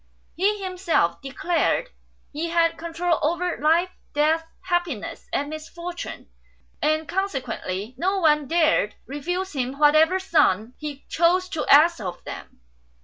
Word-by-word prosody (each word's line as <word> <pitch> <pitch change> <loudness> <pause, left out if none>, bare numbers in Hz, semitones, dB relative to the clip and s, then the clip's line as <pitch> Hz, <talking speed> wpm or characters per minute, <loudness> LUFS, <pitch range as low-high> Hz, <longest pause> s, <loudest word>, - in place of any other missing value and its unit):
He 400 +2 +1
himself 350 - 0
declared 355 - 0 0.4
he 320 +3 -3
had 335 0 +2
control 335 +1 -1
over 345 +3 0
life, 335 +4 +3 0.2
death, 315 +2 +2
happiness, 350 - -3
and 285 - -1
misfortune; 340 +3 -7 0.5
and 310 +1 +1
consequently 255 - -3
no 380 +4 +1
one 300 -5 +3
dared 320 -9 +2
refuse 355 +8 -3
him 265 -1 -2
whatever 310 +4 +5
sum 245 - +2
he 295 -2 -7
chose 355 +2 +2
to 315 -3 -3
ask 315 +3 +6
of 180 -4 -6
them. - - -9
325 Hz, 125 wpm, -24 LUFS, 290-355 Hz, 0.5 s, ask